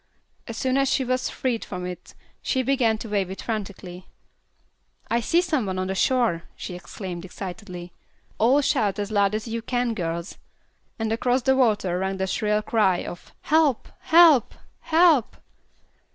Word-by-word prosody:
As 230 -2 -6
soon 260 +1 0
as 275 -1 +2
she 265 - +1
was 255 +1 -1
freed 245 -4 -2
from 180 -1 -6
it 180 -1 -8 0.3
she 260 - 0
began 250 -5 +2
to 225 - -7
wave 200 -3 0
it 190 - -7
frantically. 190 -4 -6 1.0
"I 235 - +3
see 335 +9 +2
some 305 - -1
one 185 -1 -3
on 185 +1 -2
shore," 225 -6 +1
she - - -7
exclaimed, 180 0 -7
excitedly. 180 -1 -8 0.5
"All 255 +6 +4
shout 210 -7 +1
as 205 0 -3
loud 200 -1 +2
as 215 +2 -4
you 230 0 -3
can, 245 0 -1
girls;" 170 -3 -4 0.6
and 225 -1 -1
across 245 +2 +1
the 265 +1 +3
water 210 -8 +2
rang 190 0 -2
the 190 - -1
shrill 210 +2 0
cry 200 -6 +2
of 175 - -9
"Help! 305 -5 +2
Help! 325 -6 +5 0.2
Help!" 320 -7 +3
220 Hz, 160 wpm, -24 LUFS, 190-255 Hz, 1.0 s, Help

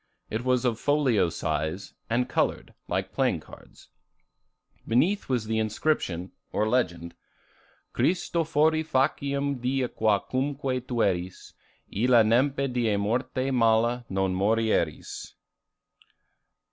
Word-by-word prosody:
It 110 +2 -2
was 125 0 +1
of 115 -2 0
folio 140 - +2
size, 80 +3 -3 0.2
and 125 +2 +1
colored, 120 - -1
like - - -2
playing - - +1
cards. - - -16 1.0
Beneath 170 - +1
was 125 -4 0
the 110 0 -1
inscription, 105 - -1 0.2
or 105 - 0
legend: 90 -9 -1 0.8
[Illustration: 180 +1 +2 0.2
Christofori 155 0 +2
faciem 140 -1 0
die 130 +1 0
qua 110 -2 +2
cumque 130 +1 -2
tueris 95 -7 -1 0.4
Illa 120 +2 +5
nempe 135 +5 +2
die 115 -4 +1
morte 130 +6 -1
mala 120 0 +2
non 95 -1 0
morieris. 110 +4 -1
120 Hz, 110 wpm, -27 LUFS, 105-135 Hz, 1.0 s, Illa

